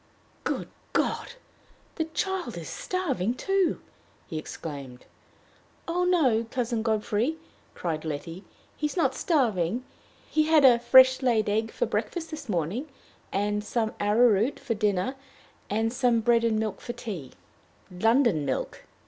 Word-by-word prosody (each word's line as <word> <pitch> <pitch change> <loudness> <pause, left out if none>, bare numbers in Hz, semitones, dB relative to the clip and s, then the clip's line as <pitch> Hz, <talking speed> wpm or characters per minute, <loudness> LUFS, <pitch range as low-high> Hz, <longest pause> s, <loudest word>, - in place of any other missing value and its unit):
"Good - - -2 0.3
God! - - 0 0.6
the 320 - -2
child 325 - -3
is 165 - -6
starving, 270 - -2
too," 390 +2 +1 0.5
he 160 - -4
exclaimed. 140 -5 -8 0.8
"Oh, 355 +2 0
no, 260 -11 +3
Cousin 240 -2 -1
Godfrey!" 220 +5 0 0.4
cried 160 -3 -3
Letty; 165 +4 -5 0.3
"he 300 - -1
is 300 - -8
not 270 -6 +2
starving. 240 - +1 0.4
He 310 0 +2
had 310 -3 +5
a 240 -2 +7
fresh 260 +2 +7
laid 235 -4 +2
egg 220 +2 0
for 485 - -1
breakfast 335 -7 -3
this 305 -5 -7
morning, 190 - -1 0.4
and 205 +1 0
some 220 +1 -1
arrowroot 220 +3 +3
for 275 -4 -2
dinner, 205 +1 0 0.6
and 225 +2 0
some 245 -3 +2
bread 235 0 +3
and 225 -2 +2
milk 215 -3 -2
for 240 - -5
tea 180 - -7 0.3
" - - -32
"London 225 - +4
milk!" 135 -2 -3
230 Hz, 140 wpm, -27 LUFS, 205-275 Hz, 0.8 s, a